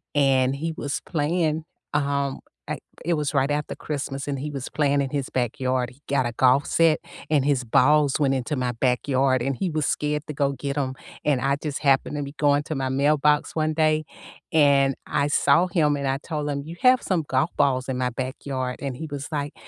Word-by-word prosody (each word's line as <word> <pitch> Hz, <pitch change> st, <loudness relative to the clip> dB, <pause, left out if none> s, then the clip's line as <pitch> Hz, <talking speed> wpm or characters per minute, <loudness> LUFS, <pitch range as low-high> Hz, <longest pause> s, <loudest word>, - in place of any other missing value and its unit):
and 135 Hz, -2 st, +3 dB
he 165 Hz, +3 st, -3 dB
was 145 Hz, -2 st, -3 dB
playing, 160 Hz, 0 st, 0 dB, 0.3 s
um, 140 Hz, -1 st, 0 dB, 0.3 s
I -, -, -3 dB, 0.3 s
it 170 Hz, -, +2 dB
was 150 Hz, -2 st, -1 dB
right 135 Hz, +2 st, +2 dB
after 150 Hz, 0 st, -2 dB
Christmas, 140 Hz, -2 st, -4 dB
and 140 Hz, -2 st, -2 dB
he 150 Hz, +2 st, -4 dB
was 135 Hz, -3 st, -5 dB
playing 145 Hz, -2 st, +1 dB
in 135 Hz, -, -3 dB
his 140 Hz, -3 st, -2 dB
backyard. 125 Hz, 0 st, -1 dB
He 135 Hz, +3 st, -21 dB
got 140 Hz, -2 st, +2 dB
a 120 Hz, -, -1 dB
golf 130 Hz, +4 st, +3 dB
set, 165 Hz, -2 st, +3 dB, 0.3 s
and 145 Hz, -3 st, +2 dB
his 135 Hz, -3 st, +2 dB
balls 145 Hz, +4 st, +4 dB
went 135 Hz, -2 st, +2 dB
into 130 Hz, +3 st, -2 dB
my 125 Hz, -1 st, -1 dB
backyard, 130 Hz, +1 st, +1 dB
and 135 Hz, 0 st, -1 dB
he 185 Hz, +4 st, -2 dB
was 155 Hz, -2 st, -1 dB
scared 150 Hz, 0 st, -1 dB
to 150 Hz, -, -6 dB
go 140 Hz, 0 st, +1 dB
get 140 Hz, 0 st, -4 dB
'em, 130 Hz, -3 st, -2 dB, 0.3 s
and 145 Hz, -4 st, +2 dB
I 140 Hz, +1 st, +1 dB
just 150 Hz, -3 st, -3 dB
happened 140 Hz, +1 st, +2 dB
to 145 Hz, -, -2 dB
be 140 Hz, +1 st, -7 dB
going 145 Hz, 0 st, +3 dB
to 155 Hz, -, -4 dB
my 135 Hz, -1 st, -1 dB
mailbox 150 Hz, +3 st, +2 dB
one 155 Hz, 0 st, +1 dB
day, 155 Hz, -1 st, +2 dB, 0.5 s
and 140 Hz, -3 st, +4 dB
I 145 Hz, -, 0 dB
saw 145 Hz, +4 st, +3 dB
him 155 Hz, -6 st, +2 dB
and 140 Hz, -1 st, -2 dB
I 135 Hz, -, +1 dB
told 150 Hz, 0 st, -4 dB
him, 140 Hz, 0 st, -2 dB
"You 165 Hz, -, -8 dB
have 255 Hz, 0 st, +5 dB
some 175 Hz, -5 st, 0 dB
golf 135 Hz, +5 st, +1 dB
balls 130 Hz, -2 st, +1 dB
in 130 Hz, -1 st, -2 dB
my 125 Hz, -1 st, +1 dB
backyard," 130 Hz, 0 st, -4 dB
and 135 Hz, -3 st, -4 dB
he 160 Hz, +1 st, -5 dB
was 145 Hz, 0 st, -5 dB
like, 145 Hz, -1 st, -3 dB
140 Hz, 215 wpm, -24 LUFS, 135-150 Hz, 0.5 s, have